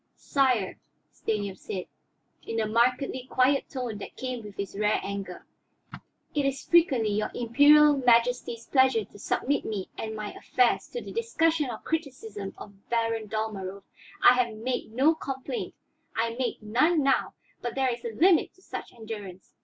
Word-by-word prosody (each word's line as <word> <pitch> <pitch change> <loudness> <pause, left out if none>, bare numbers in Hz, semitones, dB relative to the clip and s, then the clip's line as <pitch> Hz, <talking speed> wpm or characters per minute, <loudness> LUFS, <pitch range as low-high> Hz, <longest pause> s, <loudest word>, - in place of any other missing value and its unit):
"Sire," 255 -8 +1 0.3
Stanief 205 -3 -3
said, 185 -2 -5 0.6
in 225 - -3
the 220 - +1
markedly 250 +3 +1
quiet 265 +2 +2
tone 245 -6 -4
that - - -9
came 255 -3 -4
with 205 -1 -11
his 200 0 -5
rare 210 +1 +2
anger, 195 -2 -6 0.9
"it 290 - +1
is 275 0 -1
frequently 270 -11 +4
your 210 +1 0
Imperial 290 +5 +6
Majesty's 240 -2 +2
pleasure 260 -5 +3
to 205 - -16
submit 280 +7 0
me 200 -4 -4
and 220 0 -4
my 210 -1 -5
affairs 250 -2 +1
to 485 - -6
the - - -8
discussion 330 - +1
or 230 - -4
criticism 225 -11 -5
of 200 -1 -13
Baron 230 -2 0
Dalmorov. 200 -3 -4 0.4
I - - +9
have 235 -3 -3
made 240 +1 -3
no 270 +8 +4
complaint, 270 -4 -5 0.4
I 230 0 0
make 245 -2 -3
none 280 +9 +3
now, 270 0 +1 0.3
but 240 -1 -4
there 265 -2 +2
is 235 - -9
a - - -3
limit 335 - +3
to 375 - -24
such - - -7
endurance. 210 -5 -9
235 Hz, 160 wpm, -27 LUFS, 215-270 Hz, 0.9 s, I